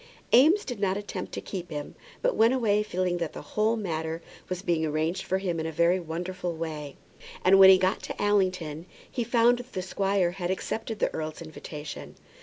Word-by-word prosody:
Eames 320 Hz, -, +6 dB
did 245 Hz, -5 st, -5 dB
not 195 Hz, -1 st, +1 dB
attempt 205 Hz, -2 st, -5 dB
to -, -, -4 dB
keep 180 Hz, -3 st, -6 dB
him, 150 Hz, -2 st, -5 dB, 0.3 s
but -, -, +2 dB
went 230 Hz, +3 st, +4 dB
away 210 Hz, -5 st, +2 dB
feeling 185 Hz, -3 st, -1 dB
that 170 Hz, -2 st, -3 dB
the -, -, -8 dB
whole 215 Hz, +2 st, +2 dB
matter 160 Hz, -6 st, -3 dB, 0.3 s
was 185 Hz, 0 st, -4 dB
being 170 Hz, -3 st, +1 dB
arranged 155 Hz, +3 st, -1 dB
for 190 Hz, -, -1 dB
him 180 Hz, -4 st, -2 dB
in 160 Hz, -, -2 dB
a -, -, -3 dB
very 170 Hz, +3 st, +3 dB
wonderful 175 Hz, +1 st, -4 dB
way. 155 Hz, -3 st, -5 dB, 0.5 s
And 195 Hz, +1 st, +7 dB
when 190 Hz, 0 st, +10 dB
he 190 Hz, -, +9 dB
got 185 Hz, +2 st, +1 dB
to -, -, -6 dB
Allington 185 Hz, -6 st, 0 dB, 0.2 s
he 245 Hz, -, -1 dB
found 240 Hz, +1 st, +3 dB
that 245 Hz, +1 st, -10 dB
the 185 Hz, -, -2 dB
squire 195 Hz, -1 st, +1 dB
had 175 Hz, -1 st, -4 dB
accepted 220 Hz, +3 st, -3 dB
the -, -, 0 dB
earl's 155 Hz, 0 st, -4 dB
invitation. 150 Hz, -2 st, -8 dB
185 Hz, 200 wpm, -27 LUFS, 165-205 Hz, 0.5 s, when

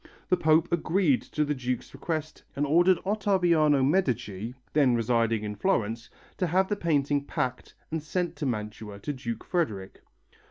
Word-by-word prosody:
The -, -, +5 dB
Pope 160 Hz, -2 st, +3 dB
agreed 165 Hz, -, +2 dB
to 150 Hz, -, -2 dB
the 150 Hz, -, 0 dB
Duke's 125 Hz, -2 st, -4 dB
request 155 Hz, -2 st, -4 dB
and 145 Hz, +2 st, 0 dB
ordered 175 Hz, +5 st, +4 dB
Ottaviano 175 Hz, -9 st, +3 dB
Medici, 125 Hz, -, 0 dB, 0.2 s
then 140 Hz, -5 st, +4 dB
residing 115 Hz, -1 st, +1 dB
in 105 Hz, 0 st, -4 dB
Florence, 115 Hz, -, -1 dB, 0.3 s
to 180 Hz, -, 0 dB
have 190 Hz, +3 st, +2 dB
the 205 Hz, -, +1 dB
painting 145 Hz, -6 st, +1 dB
packed 130 Hz, -4 st, -3 dB, 0.2 s
and 160 Hz, 0 st, -2 dB
sent 175 Hz, +3 st, -2 dB
to 145 Hz, -, -2 dB
Mantua 105 Hz, -3 st, -4 dB
to 125 Hz, +9 st, -4 dB
Duke 115 Hz, -4 st, -5 dB
Frederick. 105 Hz, -, -2 dB
145 Hz, 155 wpm, -27 LUFS, 115-170 Hz, 0.3 s, The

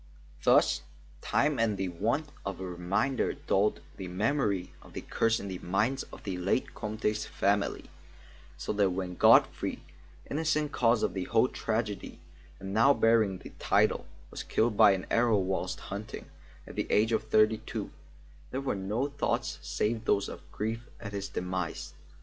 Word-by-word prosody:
Thus -, -, +4 dB, 0.4 s
time 145 Hz, -2 st, +1 dB
and 110 Hz, -3 st, +2 dB
the 95 Hz, -1 st, -1 dB
want 115 Hz, -, -1 dB
of 100 Hz, -2 st, -4 dB
a 95 Hz, -, -4 dB
reminder 95 Hz, +9 st, 0 dB
dulled 100 Hz, +2 st, +1 dB, 0.2 s
the 95 Hz, -, -5 dB
memory 100 Hz, -1 st, 0 dB
of -, -, -16 dB
the -, -, -5 dB
curse 115 Hz, 0 st, +1 dB
in 100 Hz, -, -6 dB
the 95 Hz, -2 st, -5 dB
minds 105 Hz, +9 st, 0 dB
of -, -, -11 dB
the 95 Hz, -3 st, -3 dB
late 95 Hz, +8 st, 0 dB
Comte's 110 Hz, 0 st, -2 dB
family, 100 Hz, +1 st, 0 dB, 0.7 s
so -, -, -3 dB
that 100 Hz, -2 st, +3 dB
when 90 Hz, 0 st, -3 dB
Godfrey, -, -, +4 dB, 0.4 s
innocent 155 Hz, 0 st, 0 dB
cause 115 Hz, -2 st, +3 dB
of -, -, +1 dB
the 95 Hz, -2 st, -3 dB
whole 115 Hz, +2 st, +3 dB
tragedy 110 Hz, -5 st, -3 dB, 0.4 s
and 95 Hz, 0 st, -6 dB
now 135 Hz, +6 st, +5 dB
bearing 110 Hz, -4 st, +3 dB
the -, -, -11 dB
title, -, -, +2 dB, 0.2 s
was -, -, -5 dB
killed 110 Hz, -1 st, +1 dB
by 100 Hz, -, +7 dB
an 95 Hz, -2 st, -3 dB
arrow 115 Hz, -2 st, +4 dB
whilst 95 Hz, 0 st, -1 dB
hunting, 105 Hz, +2 st, -6 dB, 0.4 s
at -, -, -10 dB
the -, -, -3 dB
age 110 Hz, +2 st, +3 dB
of 110 Hz, -, +1 dB
thirty 110 Hz, 0 st, +4 dB
two, 115 Hz, -, -5 dB, 0.6 s
there 130 Hz, -, -3 dB
were 135 Hz, -, -1 dB
no 105 Hz, +7 st, -1 dB
thoughts 145 Hz, 0 st, -2 dB
save 110 Hz, +1 st, -1 dB
those 100 Hz, -, +2 dB
of -, -, -8 dB
grief 115 Hz, +2 st, -3 dB
at 100 Hz, -3 st, -7 dB
his 100 Hz, -1 st, -4 dB
demise. 90 Hz, -1 st, -3 dB
105 Hz, 165 wpm, -30 LUFS, 95-115 Hz, 0.7 s, by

